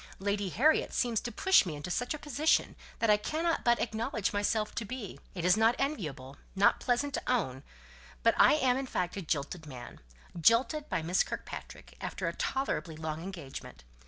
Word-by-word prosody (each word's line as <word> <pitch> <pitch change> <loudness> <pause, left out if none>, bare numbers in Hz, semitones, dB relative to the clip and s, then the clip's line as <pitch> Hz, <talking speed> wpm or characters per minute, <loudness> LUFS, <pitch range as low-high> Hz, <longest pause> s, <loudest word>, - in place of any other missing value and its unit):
Lady 200 0 -1
Harriet 300 - +3
seems 235 -3 +1
determined - - -13
to - - -6
push 380 -1 +7
me 155 - -3
into 145 +4 -6
such 245 - -1
a - - -6
position 295 +2 +1 0.2
that 230 -2 +3
I 210 - +6
cannot 320 +9 -1
but 240 0 +3
acknowledge 220 -3 -1
myself 210 +1 0
to 230 - -3
be 225 -2 -7 0.2
it 175 -2 -3
is 180 - +6
not 225 +2 +4
enviable 150 - -3 0.2
not 195 +1 +4
pleasant 280 +3 0
to - - -1
own 135 - 0 0.6
but 230 - +5
I - - +6
am, 255 -4 +2
in 270 0 -3
fact, 180 -6 -2
a 200 - -3
jilted 155 0 -3
man; 125 -4 -9 0.4
jilted 235 - +3
by 165 - -1
Miss 175 +3 +2
Kirkpatrick, - - -6
after - - -3
a - - -1
tolerably 265 - -2
long 155 0 -4
engagement. 160 - -8
210 Hz, 190 wpm, -31 LUFS, 165-255 Hz, 0.6 s, push